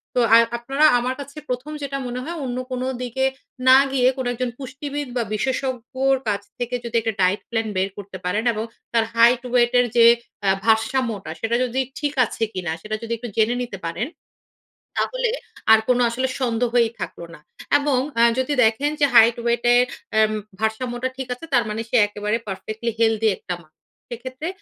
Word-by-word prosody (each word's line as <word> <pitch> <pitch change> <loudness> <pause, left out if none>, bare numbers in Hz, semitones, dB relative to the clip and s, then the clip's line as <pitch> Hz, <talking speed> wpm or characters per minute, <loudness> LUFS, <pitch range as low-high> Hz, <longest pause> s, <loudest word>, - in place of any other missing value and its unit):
তো - - +3
আ - - -2
আর 230 - +8
আপনারা 270 +6 +1
আমার 250 +2 -2
কাছে 280 +1 -9
১ম 250 +4 -3
যেটা 275 -1 -3
মনে 245 +1 -4
হয় 335 +5 -5
অন্য 245 -1 -3
কোন 250 0 -2 0.2
দিকে 250 +2 -1 0.4
না 260 - +9
গিয়ে 255 -2 +3
কোন 260 - -3
একজন 250 +1 -2
পুষ্টিবিদ 285 +2 -5
বা 240 - +1
বিশেষজ্ঞের 260 +3 0
কাছ 205 -1 0 0.2
থেকে 245 0 -2
যদি 235 0 -6
একটা 225 0 -1
ডায়েট 185 +2 +2
প্ল্যান 225 -1 -1
বের 190 +1 +1
করতে 200 -1 -8
পারেন 205 +5 0
এবং 215 0 -3 0.3
তার 230 -1 +4
হাইট, 235 +1 +5
ওয়েটের 245 0 +4
যে 230 - +8 0.4
আ - - +5 0.2
ভারসাম্যটা, 225 -4 +1
সেটা 225 +1 0
যদি 250 +1 -2 0.2
ঠিক 290 -1 -1
আছে 225 - -4
কী 185 - -3
না? - - 0
সেটা 215 +3 -3
যদি 230 0 -3
একটু 240 +1 -7
জেনে 225 +2 +3
নিতে 230 -5 -7
পারেন। 170 +9 -2 0.9
তাহলে - - 0 0.4
আর 220 - +8
কোন 250 -1 +4
আসলে 260 +3 -1
সন্দেহই 240 -1 +2
থাকল - - -6
না - - -14 0.4
এবং 285 -2 +1 0.2
আ - - +6 0.2
যদি 260 +3 0
দেখেন 230 +7 +2
যে 290 - +6
হাইট, 230 0 +7
ওয়েটে 240 +1 +2 0.4
আম 215 0 +4 0.3
ভারসাম্যটা 240 +3 -1
ঠিক 265 -1 -5
আছে। 250 - -13
তার 240 - +5
মানে 215 +1 -3
সে - - +2
একেবারে 210 +1 -2
পারফেক্টলি 215 +4 -4
হেলথি 225 -1 +3
একটা 180 - -5
মা। 155 - -24 0.4
সেক্ষেত্রে 255 +6 -6
240 Hz, 185 wpm, -22 LUFS, 220-260 Hz, 0.9 s, না